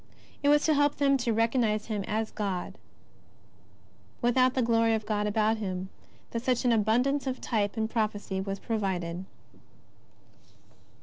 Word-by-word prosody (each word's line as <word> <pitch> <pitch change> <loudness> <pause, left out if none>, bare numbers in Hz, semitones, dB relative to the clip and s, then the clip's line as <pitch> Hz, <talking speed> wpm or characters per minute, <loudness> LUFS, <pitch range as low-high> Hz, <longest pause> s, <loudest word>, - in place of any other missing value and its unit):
It 285 - +3
was 295 0 +4
to 315 - +4
help 290 0 +2
them 275 -1 +3
to 240 -2 -1
recognize 225 -1 +1
Him 210 -3 -3
as 220 0 -1
God 195 -4 -4 1.4
without 255 +1 +3
the 260 - +2
glory 230 -1 +3
of 215 -1 -4
God 210 -1 0
about 215 +1 +1
Ilim 190 -3 -4 0.4
that 230 - -2
such 250 0 0
an 245 - +4
abundance 245 +6 +2
of 260 -1 -2
type 210 -2 -1
and 220 0 0
prophecy 210 -4 -2
was 195 0 -3
provided. 190 -5 -3
225 Hz, 145 wpm, -28 LUFS, 205-245 Hz, 1.4 s, was